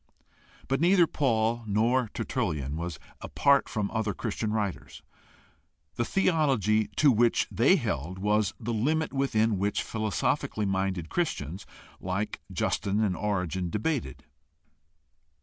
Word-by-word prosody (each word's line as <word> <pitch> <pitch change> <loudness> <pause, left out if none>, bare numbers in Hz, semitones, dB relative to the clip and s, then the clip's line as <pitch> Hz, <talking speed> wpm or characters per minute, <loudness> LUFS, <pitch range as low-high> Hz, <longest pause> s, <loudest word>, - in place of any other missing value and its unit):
But 135 +1 0
neither 175 0 +5
Paul 120 -6 0
nor 115 +4 +2
Tertullian 70 -1 -2
was 85 0 -4 0.2
apart 140 0 +2
from 105 -2 -2
other 110 -4 -1
Christian 110 -1 -3
writers. 105 -4 -3 0.9
The 120 - -1
theology 135 - +2
to 145 -3 +5
which 120 0 +2
they - - +4
held 85 +7 -3
was 105 0 +1
the 120 0 -3
limit 150 +9 0
within 115 -7 +1
which 100 +2 0
philosophically 110 -1 -1
minded 95 -3 -1
Christians 95 - -3 0.3
like 95 +3 -3
Justin 100 +1 0
and 95 -4 0
Origen 95 -3 -2
debated. 105 - -2
110 Hz, 115 wpm, -28 LUFS, 95-125 Hz, 0.9 s, neither